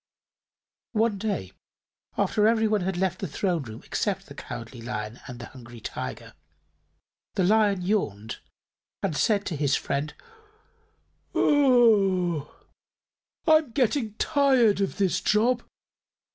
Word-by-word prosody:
One 220 Hz, -2 st, +1 dB
day, 195 Hz, -, -2 dB, 0.7 s
after 215 Hz, -1 st, +2 dB
everybody 220 Hz, -4 st, +2 dB
had 190 Hz, -1 st, -1 dB
left 185 Hz, 0 st, 0 dB
the 190 Hz, -, -3 dB
Throne 180 Hz, -5 st, -1 dB
Room 110 Hz, -4 st, -9 dB
except -, -, -2 dB
the -, -, -11 dB
Cowardly 120 Hz, 0 st, -8 dB
Lion 110 Hz, -1 st, -5 dB
and 125 Hz, -2 st, -8 dB
the 120 Hz, -, -8 dB
Hungry 120 Hz, -2 st, -12 dB
Tiger, 65 Hz, -, -6 dB, 1.0 s
the 190 Hz, -, +2 dB
Lion 205 Hz, -1 st, +3 dB
yawned 110 Hz, -, -1 dB, 0.6 s
and 185 Hz, -6 st, 0 dB
said 205 Hz, +4 st, +2 dB
to 175 Hz, -, -3 dB
his 140 Hz, -1 st, +1 dB
friend: 145 Hz, +2 st, -2 dB, 1.2 s
"I'm 200 Hz, -, +4 dB, 1.3 s
getting 245 Hz, -4 st, +1 dB
tired 260 Hz, -8 st, +3 dB
of 195 Hz, -, -1 dB
this 185 Hz, -2 st, +1 dB
job. 235 Hz, +3 st, +2 dB
190 Hz, 115 wpm, -26 LUFS, 140-220 Hz, 1.3 s, I'm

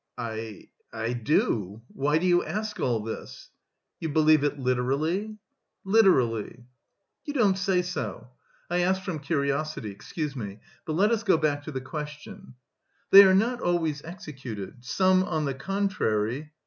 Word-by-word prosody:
"I... 110 Hz, -3 st, -6 dB, 0.2 s
I 115 Hz, +2 st, -3 dB
do. 110 Hz, -, 0 dB
Why 145 Hz, +3 st, +1 dB
do 170 Hz, -, -1 dB
you 175 Hz, -1 st, +4 dB
ask 215 Hz, +1 st, -4 dB
all 115 Hz, -3 st, 0 dB
this?" 110 Hz, 0 st, -8 dB, 0.5 s
"You 160 Hz, -, -3 dB
believe 155 Hz, -1 st, +4 dB
it 145 Hz, 0 st, 0 dB
literally?" 140 Hz, -, -1 dB, 0.5 s
"Literally." 125 Hz, -, +2 dB, 0.6 s
"You 290 Hz, -, -6 dB
don't 205 Hz, -7 st, +3 dB
say 190 Hz, -1 st, +1 dB
so.... 130 Hz, -8 st, -5 dB, 0.4 s
I 175 Hz, +1 st, 0 dB
asked 190 Hz, +2 st, +1 dB
from 175 Hz, -5 st, -4 dB
curiosity. 140 Hz, -4 st, -2 dB
Excuse 140 Hz, -, -5 dB
me. 105 Hz, -4 st, -6 dB, 0.3 s
But 160 Hz, -, -3 dB
let 200 Hz, +7 st, +3 dB
us 225 Hz, -2 st, +1 dB
go 195 Hz, -7 st, +3 dB
back 150 Hz, -2 st, 0 dB
to -, -, -5 dB
the 130 Hz, -2 st, -4 dB
question; 150 Hz, +5 st, -8 dB, 0.6 s
they 195 Hz, -, +12 dB
are 190 Hz, 0 st, +5 dB
not 240 Hz, +5 st, +1 dB
always 165 Hz, -4 st, 0 dB
executed. 130 Hz, -, -8 dB
Some, 185 Hz, +7 st, +3 dB
on 155 Hz, -4 st, -1 dB
the 140 Hz, -, -1 dB
contrary..." 145 Hz, -, -1 dB
155 Hz, 150 wpm, -27 LUFS, 125-185 Hz, 0.6 s, they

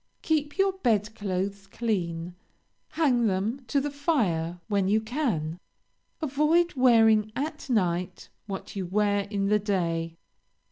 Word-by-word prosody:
Keep 295 Hz, -1 st, 0 dB
your 390 Hz, 0 st, +3 dB
bed 225 Hz, -, 0 dB
clothes 195 Hz, -1 st, -3 dB
clean; 180 Hz, -6 st, -2 dB, 0.6 s
hang 265 Hz, -8 st, +2 dB
them 210 Hz, +7 st, -1 dB
to 280 Hz, -, +2 dB
the 290 Hz, +1 st, -2 dB
fire 195 Hz, -, 0 dB
when 200 Hz, -3 st, +1 dB
you 210 Hz, +3 st, +3 dB
can. 215 Hz, -, -2 dB, 0.6 s
Avoid 310 Hz, +5 st, +2 dB
wearing 225 Hz, -4 st, +4 dB
at 300 Hz, +1 st, -4 dB
night 180 Hz, -5 st, -1 dB, 0.2 s
what 195 Hz, 0 st, -6 dB
you 190 Hz, -3 st, -3 dB
wear 205 Hz, +1 st, +1 dB
in 200 Hz, -1 st, -1 dB
the 210 Hz, +1 st, +3 dB
day. 165 Hz, -5 st, -1 dB
210 Hz, 130 wpm, -27 LUFS, 185-270 Hz, 0.6 s, wearing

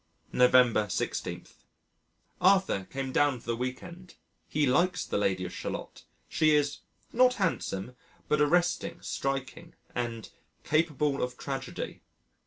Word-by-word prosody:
November 125 Hz, -4 st, +5 dB
16. -, -, -3 dB, 1.0 s
Arthur 185 Hz, -, +3 dB
came 135 Hz, -1 st, -4 dB
down 145 Hz, -2 st, +2 dB
for -, -, -19 dB
the 115 Hz, -, -1 dB
week 125 Hz, +2 st, -4 dB
end. 180 Hz, +1 st, -12 dB, 0.3 s
He 150 Hz, 0 st, +1 dB
likes 180 Hz, +8 st, +2 dB
the -, -, -1 dB
Lady 95 Hz, -2 st, 0 dB
of 90 Hz, -, -7 dB
Shalott. -, -, -6 dB, 0.2 s
She 155 Hz, -1 st, +3 dB
is 145 Hz, -1 st, +1 dB, 0.3 s
"not 250 Hz, +1 st, +5 dB
handsome, 125 Hz, -, -2 dB, 0.3 s
but 150 Hz, 0 st, +2 dB
arresting, 170 Hz, +2 st, +1 dB
striking" 135 Hz, +5 st, -4 dB, 0.2 s
and 115 Hz, -3 st, -4 dB, 0.3 s
"capable 150 Hz, -3 st, +1 dB
of 125 Hz, 0 st, -3 dB
tragedy." 135 Hz, -1 st, -5 dB
140 Hz, 125 wpm, -29 LUFS, 125-170 Hz, 1.0 s, November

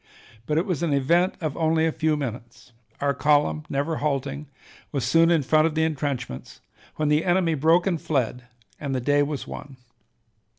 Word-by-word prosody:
But 150 Hz, -, 0 dB
it 165 Hz, -, +1 dB
was 180 Hz, -6 st, -2 dB
an 160 Hz, -4 st, +1 dB
event 170 Hz, +7 st, +2 dB
of 155 Hz, -4 st, -2 dB
only 160 Hz, 0 st, +2 dB
a 165 Hz, -, +1 dB
few 155 Hz, -1 st, 0 dB
minutes; 120 Hz, -3 st, -7 dB, 0.3 s
our 140 Hz, 0 st, +1 dB
column, 145 Hz, -, +2 dB
never 145 Hz, +3 st, -1 dB
halting, 140 Hz, 0 st, -2 dB, 0.4 s
was 135 Hz, -5 st, -2 dB
soon 165 Hz, +6 st, +4 dB
in 165 Hz, -4 st, +3 dB
front 155 Hz, +4 st, +3 dB
of 160 Hz, -, -4 dB
the 160 Hz, -, +2 dB
intrenchments, 140 Hz, -, -3 dB, 0.4 s
when 155 Hz, -1 st, 0 dB
the 150 Hz, +1 st, +3 dB
enemy 175 Hz, -2 st, +2 dB
broke 160 Hz, +4 st, +3 dB
and 175 Hz, -5 st, -1 dB
fled, 125 Hz, -4 st, -1 dB, 0.3 s
and 140 Hz, -3 st, -3 dB
the -, -, 0 dB
day 145 Hz, +3 st, +2 dB
was 145 Hz, -1 st, -2 dB
won. 135 Hz, -2 st, -9 dB
150 Hz, 180 wpm, -24 LUFS, 135-160 Hz, 0.4 s, soon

